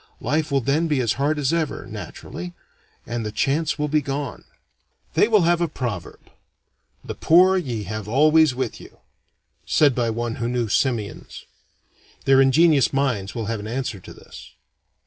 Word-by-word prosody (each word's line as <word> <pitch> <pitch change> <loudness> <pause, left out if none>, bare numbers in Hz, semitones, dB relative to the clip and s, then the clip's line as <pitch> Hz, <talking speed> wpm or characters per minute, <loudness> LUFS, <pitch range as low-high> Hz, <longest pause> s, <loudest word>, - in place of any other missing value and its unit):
Life 155 +5 -1
will 135 -1 +2
then 145 +7 +1
be 150 -4 0
as 115 -4 +1
hard 150 +2 +1
as 145 +1 0
ever, 165 -3 -2
naturally, 90 0 -8 0.5
and 120 0 -4
the 105 - -4
chance 145 +7 0
will 150 -1 -1
be 150 +1 +1
gone. 140 -1 -5 0.7
They - - +4
will 215 -5 +4
have 170 +1 +2
a 170 - +2
proverb, 120 - -6 0.7
"The - - -6
poor 185 +3 +5
ye 125 - -2
have 105 +1 -6
always 155 +3 +4
with 130 -3 -4
you," - - -15 0.7
said 145 -3 +3
by 120 -1 0
one 115 +1 -3
who 115 0 -2
knew 120 -3 -1
simians. 115 -3 -2 0.8
Their 135 0 +5
ingenious 145 +1 +4
minds 125 -8 -1
will 115 -2 -3
have 115 +1 -3
an 105 - -7
answer 120 -3 -3
to - - -13
this. - - -13
135 Hz, 165 wpm, -22 LUFS, 115-155 Hz, 0.8 s, poor